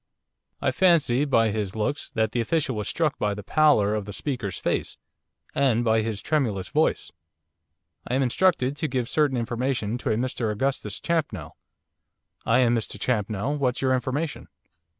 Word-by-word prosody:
I - - +2
fancy, 155 -8 +3
by 115 -6 +3
his 105 -2 -3
looks, 110 +7 -2
that 110 -1 0
the 120 - 0
official 135 +2 0
was 105 -1 -2
struck 160 -4 0
by 105 -1 0
the 105 - -7
pallor 125 -6 +3
of 105 -2 -2
the 105 - -7
speaker's 115 - -3
face, - - -2 0.6
and 120 -4 +2
by 110 -1 +3
his 110 -2 -4
tremulous 115 -12 0
voice. 155 +1 +1 1.0
'I 125 - -1
am 135 - +2
instructed 135 0 +2
to 155 - -1
give 125 -3 -2
certain 145 -1 +1
information 120 -1 -2
to - - -3
a - - +2
Mr 120 -1 -1
Augustus 105 -2 -2
Champnell.' 130 - -2 0.9
'I 115 - +4
am 120 -2 +4
Mr 115 - -3
Champnell. 115 +4 -1
What's 130 -1 0
your 130 -1 +3
information? 135 +5 -2
125 Hz, 165 wpm, -25 LUFS, 110-140 Hz, 1.0 s, I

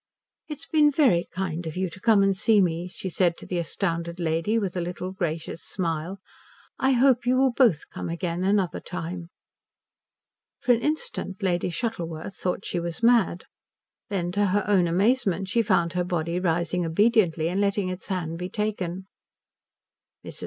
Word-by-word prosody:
"It 300 - -5
has 325 - -8
been 305 -2 +4
very 260 - +3
kind 175 -3 -3
of 160 - -6
you 185 0 0
to 190 - -11
come 210 -1 +4
and 195 -1 +2
see 215 +2 +4
me," 175 -2 +1
she 185 - -7
said 175 -1 +1
to - - -10
the 180 - -2
astounded 170 0 -2
lady, 165 +6 0
with 195 -5 -2
a 180 - -1
little 180 +1 -4
gracious 170 -4 -3
smile. 170 0 -3 0.6
"I 265 0 +3
hope 250 -1 +3
you 255 +1 +3
will 265 0 +4
both 235 - +3
come - - -5
again 170 +1 -2
another 195 -2 +1
time." 170 -1 -6 1.3
For 250 - +2
an 235 - 0
instant 265 -10 -3
Lady 180 -2 +1
Shuttleworth 170 -4 -4
thought 180 +1 -3
she 175 - -1
was 170 +4 -5
mad. 230 -7 +3 0.6
Then 180 -4 -1
to 205 +2 +2
her 200 +2 +1
own 190 -4 +4
amazement 195 0 +1
she 230 +5 +3
found 170 -5 +1
her 180 0 0
body 175 -1 -1
rising 175 0 0
obediently 170 -2 +2
and 185 +4 0
letting 200 -1 +1
its 185 0 -6
hand 170 -3 -3
be 180 +1 -4
taken. 190 -3 -3 1.2
Mrs. - - -6
185 Hz, 175 wpm, -25 LUFS, 170-210 Hz, 1.3 s, been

